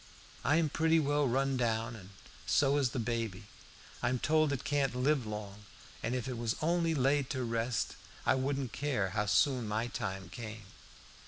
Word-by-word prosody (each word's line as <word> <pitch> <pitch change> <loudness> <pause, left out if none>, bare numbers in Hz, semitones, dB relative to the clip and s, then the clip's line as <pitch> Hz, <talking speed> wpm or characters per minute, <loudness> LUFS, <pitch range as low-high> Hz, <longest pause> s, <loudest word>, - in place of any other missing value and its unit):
I'm 160 +2 +3
pretty 160 +2 +3
well 145 -1 +2
run 135 +2 +1
down 115 -1 0
and 95 -4 -11 0.4
so 140 0 +3
is 135 -3 +2
baby. 115 -5 -2 0.6
I'm 125 +1 +1
told 155 +3 +3
it 140 - -2
can't 140 -3 +1
live 130 -1 +1
long, 105 -1 -6 0.4
and 115 +3 -1
if 125 -2 -2
it 125 -3 -4
was 115 -1 0
only 165 0 +1
laid 135 0 +2
to 130 -2 -2
rest 115 0 -1 0.3
I - - +5
wouldn't 130 -2 -1
care 130 -10 0
how 105 +2 -1
soon 120 +5 +3
my 110 +2 0
time 95 -6 -4
came. 110 0 -7
125 Hz, 165 wpm, -33 LUFS, 110-140 Hz, 0.6 s, I